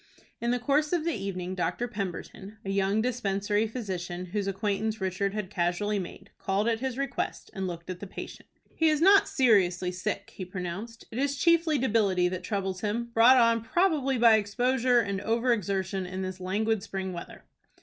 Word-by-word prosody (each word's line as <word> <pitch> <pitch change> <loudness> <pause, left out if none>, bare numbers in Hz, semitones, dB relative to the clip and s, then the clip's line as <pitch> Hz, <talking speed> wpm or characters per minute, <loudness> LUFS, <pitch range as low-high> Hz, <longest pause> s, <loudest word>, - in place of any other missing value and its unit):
In 235 - -1
the 245 - +2
course 290 +6 +1
of 335 -2 +1
the 335 - +1
evening 185 -3 -4
Dr. 180 +6 -1
Pemberton, 200 0 -6
a 195 - -2
young 195 +2 +1
dispensary 210 -3 0
physician, 185 -6 -5
whose 200 +2 -3
acquaintance 210 +2 -1
Richard 190 +1 -1
had 210 -3 -4
casually 185 +4 0
made, 190 +2 -8
called 195 +3 0
at 225 -1 +1
his 260 0 -3
request 275 0 -3
and 190 -1 -3
looked 170 -1 -7
at 185 -1 -5
the 200 - -7
patient. - - -9 0.2
"He 320 -1 +3
is 305 -1 +2
not 390 +4 +6
seriously 190 - +3
sick," 200 +2 -4
he 190 - -5
pronounced. 185 +5 -6
"It 230 - -4
is 280 +1 0
chiefly 335 -1 +3
debility 210 -8 +2
that 180 -1 -5
troubles 190 -2 -2
him, 235 +3 -2
brought 235 +3 +7
on 230 -1 +4
probably 285 -1 +1
by 230 -2 +7
exposure, 245 +4 +2
and 200 -2 -3
over 235 +3 +2
exertion 190 -2 -2
in 185 +1 -4
this 185 0 -5
languid 210 +3 0
spring 190 -2 -4
weather." 170 - -9
205 Hz, 180 wpm, -28 LUFS, 190-240 Hz, 0.2 s, brought